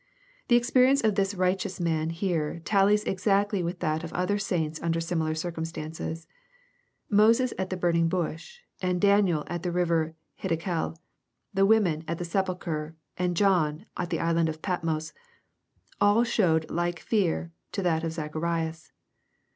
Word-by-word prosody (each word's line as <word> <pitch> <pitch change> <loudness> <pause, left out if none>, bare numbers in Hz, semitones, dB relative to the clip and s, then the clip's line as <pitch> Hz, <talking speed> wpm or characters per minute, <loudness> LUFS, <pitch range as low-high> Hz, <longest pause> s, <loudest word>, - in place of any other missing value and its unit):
The 240 - +5
experience 255 +3 +4
of 215 -1 +3
this 195 0 0
righteous 185 0 0
man 160 -2 0
here, 165 -2 -1
tallies 205 +1 +3
exactly 200 +1 +1
with 175 +1 -4
that 155 -1 0
of 170 - -6
other 195 +3 0
saints 160 -6 -2
under 165 0 0
similar 160 -2 -1
circum 165 0 -3
stances. 160 0 -5 0.8
Moses 230 +4 +4
at 190 0 -1
the 185 - -3
burning 170 -2 +2
bush, 180 - -3 0.2
and 180 -1 0
Daniel 200 -6 +3
at 175 0 -4
the 180 - -2
river 170 -2 +2
of 160 +1 -9 0.3
Hiddekel, 165 -1 -2 0.3
— - - -33
^the 195 0 +4
women 190 -8 +3
at 170 - -2
the 175 - -4
sepulchre, 170 -4 -2 0.2
and 180 -1 -1
John 165 -6 +2
at 175 - -3
the 165 - -1
isle 165 -1 +2
of 155 0 -7
Patmos, 165 -4 -2 0.4
— - - -35
all 205 +3 +5
showed 175 -9 +1
like 175 0 -1
fear 175 -5 0 0.2
to 200 - -2
that 165 -2 +1
of 165 - -1
Zacharias. 160 +1 -3
175 Hz, 160 wpm, -27 LUFS, 160-195 Hz, 0.8 s, The